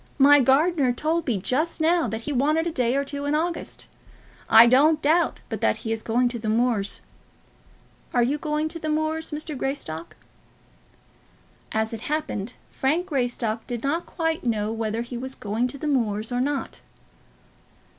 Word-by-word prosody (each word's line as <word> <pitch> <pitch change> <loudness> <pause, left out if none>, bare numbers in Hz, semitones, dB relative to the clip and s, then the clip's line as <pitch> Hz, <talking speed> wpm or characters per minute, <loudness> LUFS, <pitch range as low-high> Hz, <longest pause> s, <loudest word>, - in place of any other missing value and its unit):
"My 290 +1 +7
gardener 275 +1 +3
told 315 +6 -1
me 235 -5 +1
just 290 - -1
now 330 +1 +2
that 220 +1 -4
he 295 +5 -4
wanted 305 +5 +2
a 340 - -1
day 250 -3 0
or 280 0 0
two 285 0 -4
in 290 +1 +1
August. 335 +2 -3 0.6
I 225 +1 +9
don't 290 +6 +5
doubt 320 +3 +2
but - - -5
that - - +2
he 225 - -2
is 225 -1 -1
going 245 +3 +1
to 240 -1 -4
the 220 -1 -3
moors. 225 -3 +1 1.1
Are 245 - +3
you 280 +5 0
going 305 +1 -1
to 330 - -5
the 310 - -3
moors, 315 +1 -1
Mr. 305 0 -5
Greystock?" 250 - -4 1.6
As 220 +1 -1
it 225 - -5
happened, 250 -7 -3 0.2
Frank 310 +7 0
Greystock 245 - -2
did 240 -2 -4
not 320 +5 -1
quite 325 -1 -2
know 215 -3 0
whether 225 0 -2
he 240 0 -6
was 260 +1 -5
going 220 +4 -1
to 265 - -7
the 290 - -6
moors 225 -5 0
or 245 0 0
not. 280 +1 -3
265 Hz, 175 wpm, -24 LUFS, 230-310 Hz, 1.6 s, I